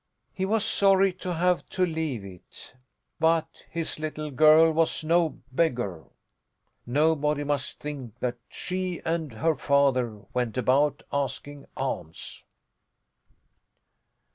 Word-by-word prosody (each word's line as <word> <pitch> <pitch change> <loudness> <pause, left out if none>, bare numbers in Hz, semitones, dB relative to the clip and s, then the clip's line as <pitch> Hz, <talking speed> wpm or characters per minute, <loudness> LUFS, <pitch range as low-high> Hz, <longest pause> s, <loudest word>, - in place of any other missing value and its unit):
He 190 - -1
was 215 +2 +1
sorry 195 -3 +4
to 180 -1 -2
have 180 +1 +2
to 185 - +1
leave 160 - -3
it. 95 +4 -13 0.5
But 165 0 +1
his 165 -2 -4
little 155 -1 -4
girl 155 +4 +6
was 160 0 +1
no 165 -2 +2
beggar! 120 - 0 0.8
Nobody 150 +2 +2
must 145 -2 -2
think 135 -6 -7
that 125 -1 -2
she 185 -1 -3
and 165 -3 -1
her 160 +9 +1
father 130 -6 +2
went 125 -2 -1
about 135 +4 +2
asking 140 +1 -3
alms. 80 - -5
150 Hz, 115 wpm, -27 LUFS, 130-165 Hz, 0.8 s, girl